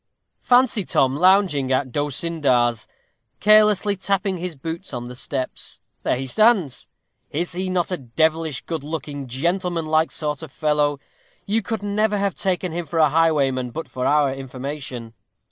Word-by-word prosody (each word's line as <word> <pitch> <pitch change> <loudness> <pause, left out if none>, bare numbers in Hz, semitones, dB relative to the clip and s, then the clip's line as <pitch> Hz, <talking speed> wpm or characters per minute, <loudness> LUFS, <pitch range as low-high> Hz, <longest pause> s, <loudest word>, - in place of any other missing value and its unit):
Fancy 245 -4 +3
Tom 135 -5 +2
lounging 180 -6 +3
at 130 0 0
D'Osyndar's, 140 -5 0 0.5
carelessly 210 -1 +4
tapping 195 -1 -1
his 175 -1 -4
boots 165 +5 -6
on 120 0 -5
the 125 - -8
steps; 130 +1 -4 0.2
there - - 0
he 135 - -4
stands! 185 - +2 0.4
Is 170 +4 -2
he 185 +1 -3
not 180 -1 0
a 180 - 0
devilish 155 +3 -1
good 160 -4 -4
looking, 145 -3 -5
gentlemanlike 165 +3 0
sort 150 -2 -2
of 160 -4 -9
fellow? 150 -2 +1 0.5
You 220 +3 +1
could 220 -1 -4
never 205 +1 +1
have 200 -2 0
taken 185 -2 -1
him 170 0 -4
for 165 - -4
a 155 -2 +5
highwayman 140 -5 +2
but 160 +7 -6
for 125 0 -3
our 145 -1 +3
information. 135 -3 -6
160 Hz, 150 wpm, -22 LUFS, 135-185 Hz, 0.5 s, a